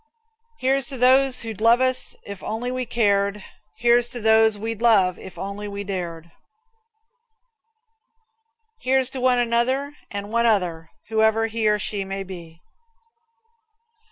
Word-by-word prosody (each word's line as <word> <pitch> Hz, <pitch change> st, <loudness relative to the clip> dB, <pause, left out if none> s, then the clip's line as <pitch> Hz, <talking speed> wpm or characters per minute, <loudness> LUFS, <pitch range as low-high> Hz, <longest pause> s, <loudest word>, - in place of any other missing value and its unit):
Here's 270 Hz, -, +1 dB
to 270 Hz, -, -1 dB
those 255 Hz, +1 st, +3 dB
who'd 220 Hz, -2 st, -7 dB
love 230 Hz, +2 st, +5 dB
us 255 Hz, 0 st, +1 dB
if 200 Hz, -2 st, -8 dB
we -, -, -8 dB
only 245 Hz, +3 st, -3 dB
cared. 200 Hz, -3 st, 0 dB, 0.3 s
Here's 240 Hz, 0 st, +3 dB
to 245 Hz, -, -4 dB
those 220 Hz, -1 st, +4 dB
we'd 225 Hz, +1 st, -5 dB
love 195 Hz, -6 st, +3 dB
if 190 Hz, -, -11 dB
we -, -, -5 dB
only 200 Hz, 0 st, -6 dB
dared. 170 Hz, -4 st, -6 dB, 2.5 s
Here's 260 Hz, 0 st, +2 dB
to 260 Hz, -, -5 dB
one 255 Hz, -1 st, +3 dB
another 245 Hz, +4 st, 0 dB
and 205 Hz, 0 st, -6 dB
one 235 Hz, +1 st, +2 dB
other, 175 Hz, -7 st, 0 dB, 0.2 s
whoever 220 Hz, 0 st, +2 dB
he 225 Hz, -1 st, -1 dB
or 210 Hz, 0 st, +3 dB
she 205 Hz, -1 st, -3 dB
may 195 Hz, 0 st, -5 dB
be. 170 Hz, -3 st, -11 dB
220 Hz, 135 wpm, -22 LUFS, 200-245 Hz, 2.5 s, love